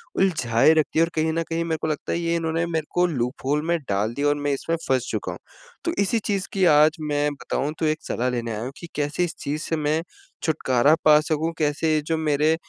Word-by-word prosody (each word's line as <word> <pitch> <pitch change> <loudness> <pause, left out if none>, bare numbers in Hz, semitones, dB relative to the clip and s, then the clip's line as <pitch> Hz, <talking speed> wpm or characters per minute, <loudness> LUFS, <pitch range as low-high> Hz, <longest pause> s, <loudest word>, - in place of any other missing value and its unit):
उलझाए 155 -7 +3
रखती 155 0 +1
है - - +6
और - - -8
कहीं 160 0 +1
न 165 0 0
कहीं 165 +1 -1
मेरे 160 -1 -1
को - - -1
लगता 150 -2 -3
है 170 - -1
ये 170 0 0
इन्होंने 165 0 0
मेरे 160 -3 -2
को 180 0 +3
लूप 125 -3 -3
होल 150 +2 +1
में 170 0 +2
डाल 105 +4 0
दिया 145 +2 0
और 145 - +3
मैं 145 -1 -1
इसमें 165 +4 -1
फँस 130 -2 +1
चुका - - -3
हूँ। - - -8 0.5
तो 335 - 0
इसी 225 +4 +1
चीज़ 200 -2 -2
की 190 -2 +2
आज 155 +3 +5
मैं 150 -1 0
बताऊँ 140 +1 -3
तो 160 - 0
एक 155 +1 0
सलाह 125 +2 -1
लेने 120 -2 -3
आया 105 0 -4
हूँ 130 - -5
कि 170 - -8
कैसे 145 +4 0
इस 170 - -3
चीज़ 150 +2 -3
से 165 - -1
मैं 155 +1 0 0.4
छुटकारा 145 -2 +3
पा 150 -1 +8
सकूँ? 160 +1 -1
कैसे 155 +1 +1
जो 165 -1 +1
मेरे 155 0 +2
155 Hz, 240 wpm, -24 LUFS, 145-165 Hz, 0.5 s, पा